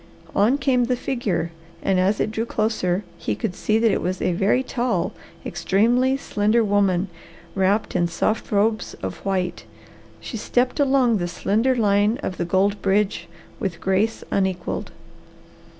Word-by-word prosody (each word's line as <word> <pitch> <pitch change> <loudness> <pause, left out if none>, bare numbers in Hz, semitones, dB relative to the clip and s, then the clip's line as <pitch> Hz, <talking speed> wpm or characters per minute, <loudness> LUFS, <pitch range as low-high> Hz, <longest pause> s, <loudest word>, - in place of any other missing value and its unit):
On 220 +7 +4
came 265 -3 +2
the 250 +1 +1
figure 230 -10 -2 0.3
and 190 -1 +2
as 195 +3 +2
it - - 0
drew 225 +1 -2
closer 210 -4 0 0.2
he 105 - -2
could 110 - -3
see 215 +3 0
that 225 -1 +3
it - - 0
was 185 +1 -2
a - - +1
very 200 +8 +2
tall, 250 -1 -1 0.3
extremely 245 +7 +2
slender 220 -2 +1
woman, 200 -3 +2 0.5
wrapped 195 +3 +1
in 175 -1 +2
soft 215 +8 -1
robes 210 0 +1
of 95 - -4
white. 185 -2 -2 0.5
She 230 - -6
stepped 250 +5 0
along 265 -5 +3
the 175 -2 -2
slender 215 +8 +1
line 210 0 +2
of 185 - -3
the - - -1
gold 195 +3 +1
bridge 200 +1 +1 0.3
with 190 -8 -3
grace 195 +5 0
unequalled. 190 -3 -1
205 Hz, 150 wpm, -23 LUFS, 190-235 Hz, 0.5 s, On